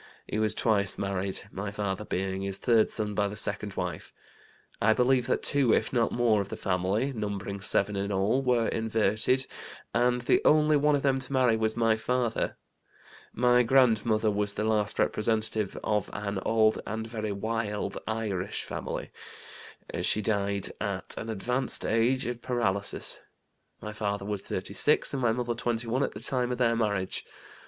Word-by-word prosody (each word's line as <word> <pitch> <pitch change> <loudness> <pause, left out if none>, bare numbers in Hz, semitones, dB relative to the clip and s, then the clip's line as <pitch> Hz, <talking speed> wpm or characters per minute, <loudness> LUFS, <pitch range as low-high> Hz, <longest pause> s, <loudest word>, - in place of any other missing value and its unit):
He 105 - -3
was 110 -1 +2
twice 100 -4 +1
married, 95 -1 -2
my 100 +1 -4
father 100 0 -3
being 95 0 -2
his 100 0 -2
third 115 -3 +3
son 105 -2 -1
by 100 0 +1
the 100 - -6
second 100 -1 -3
wife. - - -4 0.7
I 110 +1 +5
believe 125 +1 +2
that - - 0
two, 135 -5 +4
if - - -1
not 120 -3 +2
more, 115 -4 +2
of 100 - -6
the - - -5
family 95 +9 0
(numbering 100 -2 -4
seven 100 +1 +2
in 100 +1 -2
all) 100 +7 +1
were 125 -3 +2
inverted, 110 +3 +1 0.5
and 125 +1 +2
the 120 - +3
only 155 0 +5
one 145 0 +3
of 140 - -2
them 135 -1 +2
to 130 0 -6
marry 130 -4 +3
was 110 0 -1
my 115 -1 +3
father. 120 0 -1 0.7
My 125 +1 +4
grandmother 115 -3 +3
was 100 0 -1
the - - -1
last 105 -1 +1
representative 110 -1 0
of 105 -2 0
an 100 -1 -3
old 110 -1 +3
and 110 +1 -3
very 110 -2 -4
'wild' 105 +1 -2
Irish 105 -4 -2
family. - - -5 0.9
She 105 - +1
died 100 -2 -1
at - - -1
an 115 - -6
advanced 125 +5 -1
age, 120 +4 +2
of 120 0 -4
paralysis. 100 -5 -1 0.6
My 105 - -5
father 100 -2 -2
was 105 -1 -3
36 100 +14 0
and 135 - -2
my 120 -2 +3
mother 120 +1 -1
21 120 +2 -1
at - - 0
the 105 - -7
time 125 0 +1
of 125 - -2
their 115 -2 +2
marriage. 100 -5 -1
110 Hz, 165 wpm, -28 LUFS, 100-120 Hz, 0.9 s, I